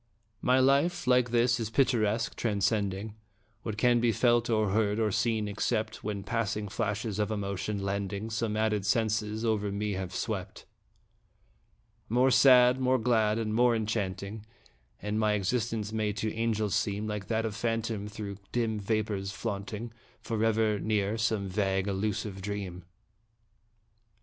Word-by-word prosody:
My 130 +1 +3
life, 140 +7 +3
like 125 -1 +3
his, 120 +1 +2
is 110 -2 -2
picturesque, 115 -3 +1
transcending 100 -1 -1 0.5
What 110 -2 -5
can 120 +1 +4
be 115 0 +3
felt, 120 +2 +2
or 110 -3 +2
heard, 105 0 +1
or 110 -2 +1
seen, 110 0 0
except 110 +1 -2
When 100 -2 -3
passing 105 -1 -2
flashes 105 0 -2
of 105 - +1
emotion, 100 -1 -3
lending 100 +2 -3
Some 110 -1 -1
added 110 -2 +1
senses, 110 +1 0
over 105 -2 0
me 105 +1 -2
have 95 -1 -4
swept. 100 -4 -4 1.4
More 125 +4 +3
sad, 125 0 +6
more 130 0 +3
glad, 110 -3 +2
and 110 -2 -2
more 120 +1 +4
enchanting 105 -1 -3 0.6
And 105 +1 -2
my 110 -1 +2
existence 110 +1 -1
may 105 -1 0
to 110 +1 -2
angels 110 -2 0
seem 105 -1 0
Like 105 -2 -4
that 115 0 0
of 110 -2 -3
phantom 115 -2 -2
through 105 -2 -6
dim 115 -3 0
vapors 105 -2 -1
flaunting, 105 +1 -5 0.3
Forever 110 -1 +1
near 105 -1 0
some 110 -3 0
vague, 95 0 0
elusive 100 0 -2
dream. 95 -3 -5
110 Hz, 140 wpm, -29 LUFS, 100-115 Hz, 1.4 s, sad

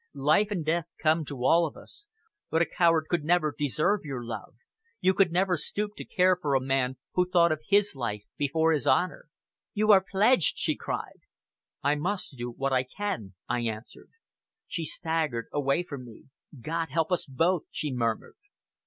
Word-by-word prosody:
Life 150 +9 +3
and 180 -7 -3
death 165 +1 0
come 160 0 +2
to 135 -3 -4
all 170 +3 +5
of - - -11
us, 415 - -10 0.4
but 160 - +1
a - - 0
coward 165 -3 +2
could 170 -2 0
never 155 -2 +2
deserve 155 +8 +1
your 135 -5 -5
love 110 -3 -7 0.4
you 185 +1 +3
could 190 -2 +3
never 180 +1 +2
stoop 205 +7 -2
to - - -7
care 185 0 +3
for 150 -6 -1
a - - +4
man 130 -1 0 0.2
who 180 0 +1
thought 170 -2 +4
of 155 -1 -1
his 205 -3 +3
life 105 -5 -3
before 160 +3 +1
his 150 -5 0
honor." 180 +5 +1 0.5
"You 215 +1 +4
are 190 -2 +7
pledged!" 200 - +3
she - - 0
cried. - - -5 0.6
"I 145 - +3
must 175 +1 -3
do 120 -1 -5
what 135 +3 -2
I 130 - +4
can," 125 - -5
I 125 - 0
answered. 110 -1 -6 0.6
She 165 -3 -4
staggered 155 -8 -1
away 145 +3 +1
from 140 -7 -8
me. 120 +2 -14 0.3
"God 165 +4 -2
help 160 +4 0
us 180 - 0
both!" 165 +6 +1
she 150 -3 -3
murmured. 115 - -2
155 Hz, 180 wpm, -28 LUFS, 135-180 Hz, 0.6 s, are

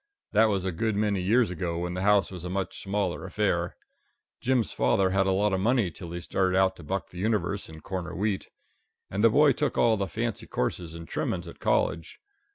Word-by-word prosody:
That 110 +1 +5
was 100 -4 0
a 95 - 0
good 110 +5 -1
many 105 -2 +1
years 110 +3 +3
ago 85 -1 -3
when 90 +1 -3
the 90 - -3
house 105 0 +3
was 90 -3 -7
a 90 - -4
much 95 +1 -3
smaller 100 -2 -1
affair. - - -1 0.6
Jim's 125 -4 +1
father 65 +10 +2
had 95 0 +2
a - - +3
lot 100 +2 +2
of 95 - +1
money 110 -2 +2
till 85 +2 -9
he 85 0 -5
started 95 +1 +1
out 95 0 +3
to 85 - -11
buck 95 +5 -3
the 90 - -8
universe 100 -2 -1
and 80 -1 -11
corner 95 -2 -4
wheat. 100 0 -1 0.6
And 100 +3 -1
the 115 - +8
boy 145 +4 +5
took - - -1
all 115 -2 +4
the 100 0 -1
fancy 80 - -3
courses 85 -2 -2
and 85 0 -8
trimmings 90 -1 -2
at 85 - -11
college. 85 0 0
95 Hz, 215 wpm, -27 LUFS, 90-105 Hz, 0.6 s, the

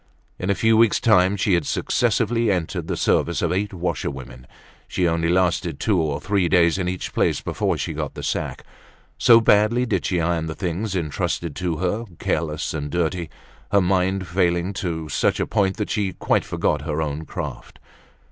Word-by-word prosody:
In 90 - -3
a 100 - +3
few 110 +2 +3
weeks' 115 -2 +4
time 95 -3 +4
she 100 0 +1
had 85 -4 +1
successively 115 0 +1
entered 90 -4 -2
the - - -2
service - - +1
of 85 - +1
eight 100 +3 -1
washerwomen; 65 -8 -5 0.4
she 90 - 0
only 80 0 0
lasted 85 -3 +1
two 100 -6 +2
or 75 -3 -1
three 100 -4 0
days 85 0 +3
in 90 -1 -1
each 90 0 -5
place - - +1
before - - -1
she - - -3
got - - -4
the - - -7
sack, - - -3 0.6
so 115 -1 +7
badly 110 +3 +3
did 110 -5 -1
she 90 - 0
iron 85 -1 0
the 80 - -5
things 95 +3 -3
entrusted 80 -1 -2
to 90 -3 -2
her, 95 +6 -1
careless 75 -2 -2
and 75 -2 -4
dirty, 85 0 -1 0.4
her 100 - +5
mind 95 0 +1
failing 85 +1 0
to 85 -4 -3
such - - 0
a - - +1
point 100 -3 0
that 105 - -3
she 100 -3 -1
quite - - 0
forgot - - 0
her 75 +1 -3
own 75 0 -2
craft. - - -7
90 Hz, 185 wpm, -22 LUFS, 80-100 Hz, 0.6 s, so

